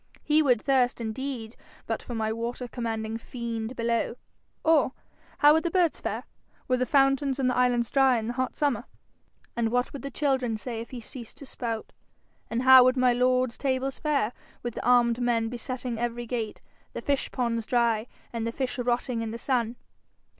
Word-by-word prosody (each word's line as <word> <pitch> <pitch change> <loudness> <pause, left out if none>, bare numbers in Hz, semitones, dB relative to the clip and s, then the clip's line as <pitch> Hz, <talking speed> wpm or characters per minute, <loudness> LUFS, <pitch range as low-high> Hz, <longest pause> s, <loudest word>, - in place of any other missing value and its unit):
He 305 +1 +4
would 250 -6 +3
thirst 255 -1 +2
indeed 235 0 -4 0.3
but - - -2
for 240 - -6
my 220 -1 0
water 235 +2 -4
commanding 225 -2 -3
fiend 235 0 -5
below. 230 0 0 0.5
Or 310 -5 +4 0.4
how 295 +1 +7
would 320 - +3
the 340 - -1
birds 345 -2 +1
fare, - - -3 0.4
were 255 - +2
the 255 0 0
fountains 275 +1 +3
on 265 - +1
the 250 - +2
islands 245 -2 +2
dry 270 -2 +4
in 220 - -3
the 240 - -2
hot 255 +1 -2
summer? 275 -6 0 0.7
And 235 -1 +1
what 245 +2 0
would 280 - -6
the 275 - -5
children 265 -6 0
say 230 0 -5
if 235 - -9
he 250 -2 -7
ceased 235 0 -9
to 280 - -10
spout? 230 -4 -5 0.6
And 235 +2 -1
how 260 -1 +9
would 255 +1 +3
my 255 -1 +4
lord's 255 0 +1
tables 265 -1 -1
fare, 280 -7 0 0.3
with 240 -1 -3
the - - -5
armed 240 -1 +4
men 230 -2 +1
besetting 245 0 -4
every 240 0 -2
gate, 230 -2 -4 0.3
the - - -5
fish 280 -1 0
ponds 230 -3 -1
dry, 235 -2 +2 0.3
and 230 -1 -2
the - - -1
fish 260 +1 -3
rotting 245 -1 0
in 225 - -3
the 230 - -5
sun? 240 -2 0
245 Hz, 190 wpm, -27 LUFS, 230-260 Hz, 0.7 s, how